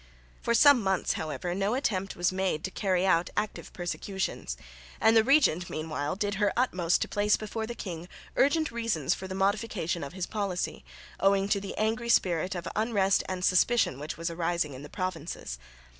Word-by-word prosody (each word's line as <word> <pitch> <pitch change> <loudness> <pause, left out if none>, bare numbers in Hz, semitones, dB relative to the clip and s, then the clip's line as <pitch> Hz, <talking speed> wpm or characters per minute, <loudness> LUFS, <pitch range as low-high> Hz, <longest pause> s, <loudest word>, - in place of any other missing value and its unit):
For 235 - +1
some 285 -1 +7
months 190 -2 +1
however 165 +3 -3
no 200 +5 0
attempt 195 -7 -1
was 175 +1 +1
made 185 -4 -1
to 190 - -3
carry 185 -2 +1
out 175 -2 +3
active 215 - -3
persecutions; 175 - -3 0.4
and 225 - +5
the 225 - +7
regent 240 - +3
meanwhile 155 0 -3
did 205 +1 -1
her 205 -1 +3
utmost 180 -9 +2
to - - -5
place 205 0 +2
before 220 +1 -4
the 240 - -5
king 175 -5 -6 0.3
urgent 310 +3 +3
reasons 230 - 0
for 190 - -6
the 185 - -5
modification 195 -4 0
of 140 - -7
his 185 -2 -3
policy, 200 -4 -3 0.4
owing 195 0 +3
to 200 -1 +2
the 195 - -6
angry 225 +2 0
spirit 180 -4 +2
of 175 -1 -5
unrest 205 -3 +2
and 185 -1 -2
suspicion 185 - +3
which 150 +1 -5
was 165 +1 -3
arising 170 -3 -1
in 130 - -8
the 145 - -9
provinces. 170 - -4
190 Hz, 180 wpm, -29 LUFS, 175-215 Hz, 0.4 s, some